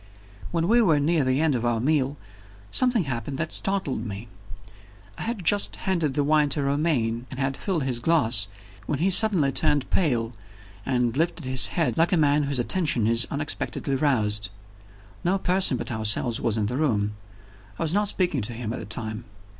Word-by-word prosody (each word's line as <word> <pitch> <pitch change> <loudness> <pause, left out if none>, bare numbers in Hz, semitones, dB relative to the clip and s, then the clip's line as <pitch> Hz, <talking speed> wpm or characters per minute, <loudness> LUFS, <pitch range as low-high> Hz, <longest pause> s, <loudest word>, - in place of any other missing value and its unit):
When 170 -1 -1
we 235 +4 +4
were 160 -9 +3
near 155 +1 +1
the 130 +1 0
end 160 -2 +2
of 120 -2 -2
our 120 -1 0
meal, 140 +1 0 0.5
something 245 -5 +2
happened 135 0 -4
that 160 +1 -3
startled 190 - -1
me. 105 +1 -7 0.9
I - - -10
had 225 -6 -4
just 205 +4 +3
handed 165 -8 -1
the 145 - +1
wine 150 0 +2
to 145 0 0
Romayne, 140 -5 -1
and 130 - -8
he - - 0
had 135 0 -1
filled 175 -3 -2
his 125 -3 -1
glass 120 -9 +2 0.4
when 150 - -1
he 185 +6 +1
suddenly 185 -9 +4
turned 145 -2 +1
pale, 120 -9 0 0.5
and 125 -3 0
lifted 165 -1 -1
his 130 -2 +5
head 150 -8 0
like 170 +4 +3
a 180 - +3
man 145 -1 +3
whose 140 -1 -2
attention 130 - +1
is 115 +1 +5
unexpectedly 145 -1 -3
roused. 110 -7 0 0.7
No 185 +3 +1
person 185 -7 +2
but - - -5
ourselves 110 +1 0
was 115 -1 0
in 105 - 0
the 125 +5 -3
room; 105 -9 0 0.6
I - - -2
was 160 0 -1
not 205 +1 +1
speaking 180 - 0
to 110 +3 -4
him 115 -1 -5
at - - -5
the - - -7
time. 110 +1 -5
140 Hz, 190 wpm, -24 LUFS, 120-165 Hz, 0.9 s, his